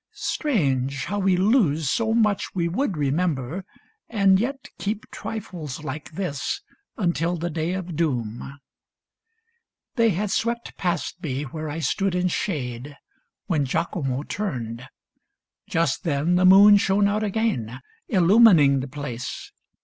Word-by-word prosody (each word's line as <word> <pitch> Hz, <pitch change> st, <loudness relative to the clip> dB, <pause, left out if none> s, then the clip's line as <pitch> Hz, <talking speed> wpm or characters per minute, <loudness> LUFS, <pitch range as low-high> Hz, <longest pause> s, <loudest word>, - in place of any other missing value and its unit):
Strange, 140 Hz, -, -1 dB
how 205 Hz, +2 st, -2 dB
we 190 Hz, -2 st, +2 dB
lose 185 Hz, -, +2 dB
So 220 Hz, -, +1 dB
much 215 Hz, -4 st, +1 dB
we 170 Hz, -2 st, +1 dB
would 190 Hz, -, -1 dB
remember, 150 Hz, +2 st, -1 dB, 0.5 s
and 195 Hz, -4 st, +4 dB
yet 265 Hz, +4 st, -3 dB
keep 210 Hz, +1 st, -3 dB
Trifles 165 Hz, -10 st, -6 dB
like 150 Hz, +2 st, -6 dB
this 175 Hz, -, -3 dB, 0.4 s
until 170 Hz, -3 st, 0 dB
the 170 Hz, +1 st, -3 dB
day 160 Hz, +2 st, -2 dB
of 180 Hz, -3 st, -5 dB
doom! 135 Hz, -4 st, -2 dB, 1.4 s
They 230 Hz, -1 st, +4 dB
had 200 Hz, +1 st, -1 dB
swept 235 Hz, +1 st, -2 dB
past 175 Hz, 0 st, -2 dB
me 140 Hz, -4 st, -3 dB
where 155 Hz, +2 st, -6 dB
I 145 Hz, -, -4 dB
stood 185 Hz, +6 st, 0 dB
in 180 Hz, 0 st, +1 dB
shade 140 Hz, -, -3 dB, 0.5 s
When 160 Hz, -7 st, +1 dB
Giacomo 135 Hz, -1 st, -2 dB
turned. 130 Hz, -, -4 dB, 0.8 s
Just 165 Hz, -5 st, 0 dB
then 155 Hz, +1 st, +1 dB
the 180 Hz, +1 st, +3 dB
moon 200 Hz, +2 st, +8 dB
Shone 200 Hz, +1 st, +2 dB
out 210 Hz, +1 st, 0 dB
again, 200 Hz, -, -1 dB, 0.3 s
illumining 180 Hz, -, +6 dB
the 130 Hz, -, -4 dB
place. 130 Hz, -4 st, -6 dB
170 Hz, 130 wpm, -24 LUFS, 140-200 Hz, 1.4 s, moon